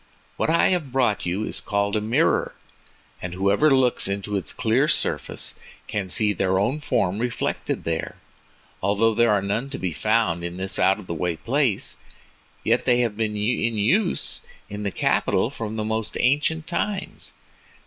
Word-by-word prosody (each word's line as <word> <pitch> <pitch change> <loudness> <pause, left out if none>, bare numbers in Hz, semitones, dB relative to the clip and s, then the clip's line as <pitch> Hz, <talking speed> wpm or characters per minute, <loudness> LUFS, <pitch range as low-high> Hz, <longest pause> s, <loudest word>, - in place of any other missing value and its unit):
What - - -1
I 165 - +4
have 170 -8 -1
brought 120 -8 +1
you 95 +5 -1
is - - -2
called 100 0 -1
a 105 - +1
mirror, 110 +2 +1 0.7
and 90 0 -5
whoever 100 +10 +3
looks 130 -6 +3
into 100 +1 -3
its 95 - -2
clear 125 +5 +1
surface - - 0 0.3
can 95 -3 -3
see 105 +3 +3
their 95 0 +1
own 120 +10 0
form 100 -9 0
reflected 120 -1 -2
there. 80 -1 -3 0.7
Although 105 +3 +2
there 120 +1 +3
are 100 -2 +2
none 110 +7 -2
to 135 - -4
be 90 -3 -3
found 105 -4 +1
in 85 +1 -5
this 95 0 -1
out 95 +1 +4
of 105 - -10
the 85 - -4
way 85 +1 -1
place, 125 - 0 0.7
yet - - +1
they 125 0 +3
have 115 -4 -1
been 105 -1 -2
in 115 +1 0
use 175 - +1 0.3
in 105 0 -5
the 105 - -1
capital - - +1
from 110 -1 -5
the 110 -1 -2
most 110 0 -2
ancient 150 +5 +2
times. 195 +3 -3
110 Hz, 170 wpm, -24 LUFS, 100-125 Hz, 0.7 s, I